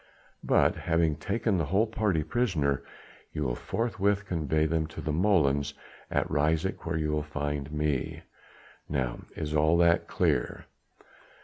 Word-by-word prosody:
But, - - +3
having 80 -2 +1
taken 100 +5 0
the 80 - 0
whole 95 +9 +2
party 105 -7 0
prisoner, 80 - 0 0.5
you 75 - -2
will 60 -3 0
forthwith 100 - -1
convey 80 -4 0
them 80 0 0
to 80 - -10
the 75 - -2
molens 75 -5 +2 0.3
at - - 0
Ryswyk, 80 +5 0
where 80 -1 0
you 75 -1 0
will 75 0 0
find 75 -1 -3
me. 75 -3 -1 0.7
Now 65 -5 -2
is 75 0 -3
all 80 +2 +4
that 85 0 +4
clear?" - - 0
80 Hz, 140 wpm, -28 LUFS, 75-90 Hz, 0.7 s, all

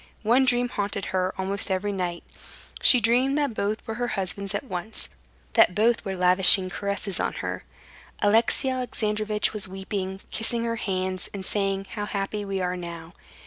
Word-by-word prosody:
One 245 +5 +4
dream 245 -1 +2
haunted 200 -3 -3
her 185 0 +1
almost 195 +2 0
every 190 +2 -1
night. 180 -3 -3 0.6
She 250 - +7
dreamed 250 +5 +2
that 285 -5 0
both 210 +1 -2
were 225 - -4
her 245 - +1
husbands 195 +1 -2
at 205 - -2
once, 215 -1 -4 0.4
that 225 -6 +5
both 230 +2 +2
were 190 -1 -4
lavishing 185 +1 +6
caresses 200 -1 -2
on - - -1
her. - - -4 0.5
Alexey 225 +5 +3
Alexandrovitch 215 -5 -1
was 210 -3 -2
weeping, 190 0 -5
kissing 230 +1 -1
her 230 0 -2
hands, 185 -2 -2
and 190 -1 -6
saying, 195 -1 -1
"How 205 - -4
happy 205 +1 -3
we 195 -1 -3
are 180 0 -1
now!" 170 -1 -8
200 Hz, 165 wpm, -25 LUFS, 190-225 Hz, 0.6 s, She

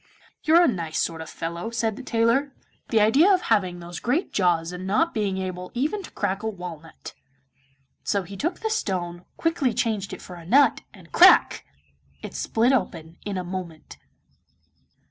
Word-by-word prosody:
'You're 335 +2 +5
a - - +5
nice 170 - -2
sort 165 -1 -1
of 160 - -8
fellow,' 170 +5 -5
said 230 -2 -1
the 270 - -8
tailor; 255 +3 +1 0.3
'the 225 - +3
idea 270 - +5
of 370 -2 +3
having 185 - 0
those 175 0 -8
great 275 +10 -1
jaws 175 -3 +1
and 180 +1 -6
not 325 - +1
being 200 -3 -1
able 180 -1 -5
even 305 +12 -1
to 375 - -10
crack 195 -1 -2
a 220 - -2
walnut!' 175 -5 -9 0.9
So 200 -2 0
he 195 +3 -10
took 325 - -3
the 440 - -1
stone, 180 - -3
quickly 325 -7 0
changed 215 -4 -1
it - - -7
for 180 - -10
a 170 - -11
nut, 270 +12 +4
and - - -17
crack! - - +6 0.6
it - - -7
split 230 +3 +1
open 170 -8 -2
in 200 -2 -3
a 185 - -2
moment. 175 -3 -7
200 Hz, 175 wpm, -24 LUFS, 175-250 Hz, 0.9 s, crack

